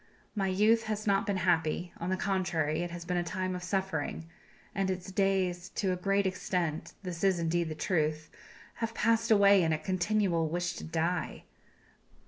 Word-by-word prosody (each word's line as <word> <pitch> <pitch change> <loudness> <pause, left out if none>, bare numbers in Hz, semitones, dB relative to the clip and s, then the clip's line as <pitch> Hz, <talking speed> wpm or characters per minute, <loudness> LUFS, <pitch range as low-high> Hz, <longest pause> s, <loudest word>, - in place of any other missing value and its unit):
My 195 -3 0
youth 215 +4 +3
has 215 -1 -3
not 200 +2 +2
been 200 -2 0
happy; 175 -1 +1
on 170 - -3
the 185 - 0
contrary, 175 -5 0
it 175 - -3
has 170 0 -7
been 180 0 -1
a 175 - +1
time 185 +1 -2
of 180 - -5
suffering, 190 -2 -2 0.5
and 195 -1 0
its 185 0 -4
days 185 -2 0
to 190 -2 +1
a - - -1
great 195 +2 +1
extent 180 -4 -2
this 180 -1 -5
is 190 -2 +4
indeed 170 0 0
the 155 - -4
truth 155 -3 -1 0.5
have 230 0 -3
passed 230 +1 +2
away 200 -2 +6
in 165 -2 +1
a 155 - +2
continual 180 0 0
wish 175 +2 -1
to - - -7
die. 165 +2 -2
185 Hz, 180 wpm, -30 LUFS, 170-195 Hz, 0.5 s, away